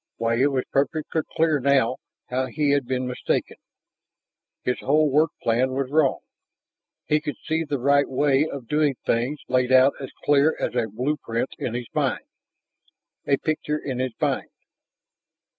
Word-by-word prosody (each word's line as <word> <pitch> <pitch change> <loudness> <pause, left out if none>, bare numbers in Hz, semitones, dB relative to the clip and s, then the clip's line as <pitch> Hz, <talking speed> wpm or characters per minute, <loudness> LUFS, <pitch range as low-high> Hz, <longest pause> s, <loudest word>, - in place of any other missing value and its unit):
Why, 115 +1 0
it 140 - +5
was 130 -2 0
perfectly 155 +3 0
clear 160 -2 +3
now 130 -2 +2 0.3
how 130 +1 -1
he 145 +2 0
had 140 -3 +1
been 130 0 -1
mistaken! 125 0 -2 1.1
His 125 - -1
whole 150 +1 +2
work 155 +4 +4
plan 125 +3 +1
was 135 0 -2
wrong; 150 -3 +2 0.8
he 150 0 +2
could 150 -1 -4
see 160 0 0
the 145 -2 -2
right 140 +2 +3
way 140 +2 +2
of 135 -4 -7
doing 150 -1 +2
things 120 +6 0
laid 125 0 +1
out 130 +2 +6
as 135 - -6 0.2
clear 145 +2 +4
as - - -2
a 120 -2 0
blueprint 125 +1 -2
in 120 - -3
his 120 0 -3
mind. - - -1 1.0
A 140 - +3
picture 150 -1 -2
in 135 -4 -4
his 130 -2 -2
mind! - - -1
135 Hz, 160 wpm, -24 LUFS, 125-150 Hz, 1.1 s, out